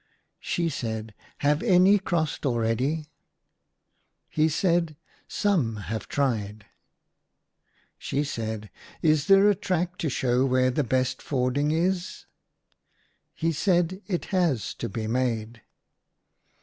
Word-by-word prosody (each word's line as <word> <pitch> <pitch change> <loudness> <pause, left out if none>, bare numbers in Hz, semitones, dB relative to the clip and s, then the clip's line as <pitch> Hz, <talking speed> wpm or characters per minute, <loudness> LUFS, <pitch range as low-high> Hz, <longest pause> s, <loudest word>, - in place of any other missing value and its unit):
She 170 -1 -1
said, 110 -7 -4 0.3
"Have'any 185 +6 +4
crossed 165 -5 -1
already?" 130 +5 0 1.2
He 155 +1 +2
said, 170 -1 +1
" - - -31
Some 165 - +1
have 110 +1 -5
tried! 110 -7 -1 0.7
" - - -43
She 145 - -1
said, 110 -6 -4
" - - -22
Is 155 -2 +3
there 195 +1 +6
a 205 - +5
track 180 -2 -2
to 155 - -1
show 125 -1 +1
where 130 -1 +2
the 145 +4 0
best 130 0 0
fording 135 +2 0
is 175 +3 -1 0.5
?" - - -54 0.5
He 165 +1 0
said, 175 +3 +1
It 180 -4 -2
has 170 - +1
to - - -3
be 110 +2 -4
made." 115 -1 -2
145 Hz, 125 wpm, -26 LUFS, 120-175 Hz, 1.2 s, there